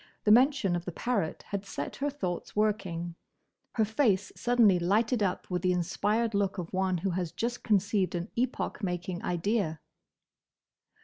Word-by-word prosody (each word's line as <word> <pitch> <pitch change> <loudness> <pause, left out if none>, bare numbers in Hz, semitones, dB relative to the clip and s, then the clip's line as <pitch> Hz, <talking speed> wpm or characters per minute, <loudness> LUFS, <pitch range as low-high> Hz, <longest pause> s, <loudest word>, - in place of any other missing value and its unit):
The 210 - +4
mention 250 -5 +5
of 175 0 -3
the 180 - -3
parrot 205 -4 -2
had 200 -1 -2
set 145 -8 -5
her 285 +1 0
thoughts 185 -12 -4
working; 190 -5 0 0.6
her 220 - +3
face 210 -4 +1
suddenly 230 -7 +4
lighted 220 +7 +2
up 190 -3 -1
with 180 -1 0
the 185 - +2
inspired 210 +6 0
look 200 -1 0
of 175 -1 -5
one 185 -1 +1
who 190 +3 -1
has 175 -2 -2
just 235 +8 -3
conceived 200 -3 +1
an 175 +4 -4
epoch 245 -2 -1
making 180 -1 -3
idea. 180 -2 0
195 Hz, 160 wpm, -29 LUFS, 180-220 Hz, 0.6 s, mention